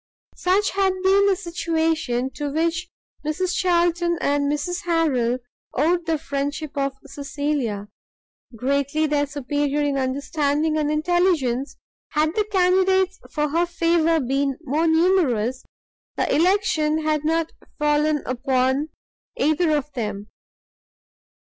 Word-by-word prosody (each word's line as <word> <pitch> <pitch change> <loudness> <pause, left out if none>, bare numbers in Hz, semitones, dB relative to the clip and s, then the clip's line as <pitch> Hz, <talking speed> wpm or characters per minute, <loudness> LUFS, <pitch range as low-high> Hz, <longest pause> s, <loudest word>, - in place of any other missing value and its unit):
Such 385 +3 +2
had 385 -1 +2
been 395 +1 +4
the 395 - +3
situation 320 -8 -1
to 290 0 -4
which 335 +4 -1 0.3
Mrs 355 +4 -1
Charlton 345 -1 +2
and 285 0 +1
Mrs 355 +4 -2
Harrel 280 -8 +1 0.4
owed 335 +5 +1
the 325 -1 +1
friendship 285 0 -4
of 275 -1 -1
Cecilia. 280 -6 -3 0.7
Greatly 280 +5 0
their 290 -1 +1
superior 290 +1 -1
in 280 -1 0
understanding 285 +3 0
and 300 -1 0
intelligence, 305 -5 +1 0.4
had 310 +1 +1
the 425 - +1
candidates 380 0 +2
for 300 0 -1
her 340 +4 +1
favour 335 -1 +2
been 275 0 0
more 310 +3 0
numerous, 320 - +2 0.5
the - - 0
election 315 -3 +2
had 305 -1 0
not 325 +1 0 0.3
fallen 295 0 +1
upon 260 +3 0 0.5
either 310 +3 +2
of 295 +1 -5
them. 210 -4 -4
305 Hz, 115 wpm, -23 LUFS, 280-340 Hz, 0.7 s, been